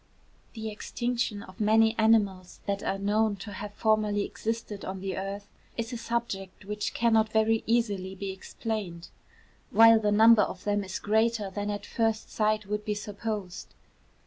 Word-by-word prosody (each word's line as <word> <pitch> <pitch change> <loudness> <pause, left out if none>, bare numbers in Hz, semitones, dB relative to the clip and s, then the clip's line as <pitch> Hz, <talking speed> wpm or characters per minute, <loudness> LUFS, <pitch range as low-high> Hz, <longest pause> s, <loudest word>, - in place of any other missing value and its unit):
The 220 -1 -5
extinction 235 -1 -2
of 185 - -14
many 220 +1 +4
animals 200 -5 +2
that 200 0 -1
are 195 - -1
known 210 +2 +1
to 200 +2 -9
have 205 +1 -7
formerly 215 -2 +1
existed 220 -2 -4
on 190 0 -5
the 190 -1 -3
earth, 200 +1 -5 0.3
is 230 +1 -3
a - - -3
subject 230 -5 -4
which 210 +1 -3
cannot 225 -2 +3
very 220 0 +2
easily 205 -5 0
be 195 0 -4
explained, 190 -3 -5 0.6
while 225 0 +7
the 210 -1 +1
number 220 +1 +7
of 185 -2 -3
them 205 0 0
is 185 -1 -5
greater 220 -1 +1
than 205 +1 -3
at 205 0 -4
first 225 -1 -1
sight 215 0 +1
would 210 +1 -3
be 210 0 -2
supposed. 205 -2 -5
210 Hz, 160 wpm, -28 LUFS, 200-225 Hz, 0.6 s, while